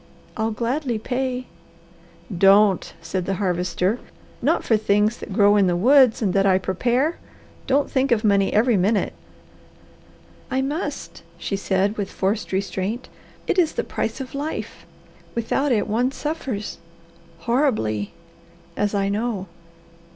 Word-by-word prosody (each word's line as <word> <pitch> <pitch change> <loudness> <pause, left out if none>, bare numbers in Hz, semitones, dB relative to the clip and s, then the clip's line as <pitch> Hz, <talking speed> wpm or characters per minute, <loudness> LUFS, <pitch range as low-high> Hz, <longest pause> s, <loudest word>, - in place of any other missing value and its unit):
I'll 220 0 0
gladly 240 +3 -1
pay 255 +2 -2 0.4
" 200 - -14 0.2
"Don't!" 200 -2 +3
said 185 +1 -3
the 195 - 0
Harvester. 180 +3 0 0.4
"Not - - +2
for 225 - +3
things 210 +1 +2
that - - -9
grow 205 +1 +4
in 195 -2 +4
the 175 - +1
woods 250 +4 +5
and 190 -4 +1
that 195 0 +3
I 185 -1 +5
prepare. 240 - 0 0.5
Don't 280 +2 +2
think 265 0 0
of 230 -2 +3
money 200 -2 +3
every 225 +1 +3
minute." 195 +2 +1 1.4
"I 265 +1 0
must," 295 +7 -4 0.2
she 200 - -3
said 195 +1 0
with 200 -2 -2
forced 200 +3 -1
restraint. 195 +4 -2 0.4
"It 370 - +1
is 330 -3 +2
the - - -1
price - - -3
of 260 -1 -7
life. 290 +3 -5 0.5
Without 260 +5 0
it 220 -4 +1
one 240 +5 +1
suffers 270 -9 -4 0.6
horribly 215 - 0 0.6
as 205 0 0
I 195 -1 +1
know. 205 -1 -2
215 Hz, 140 wpm, -22 LUFS, 195-255 Hz, 1.4 s, woods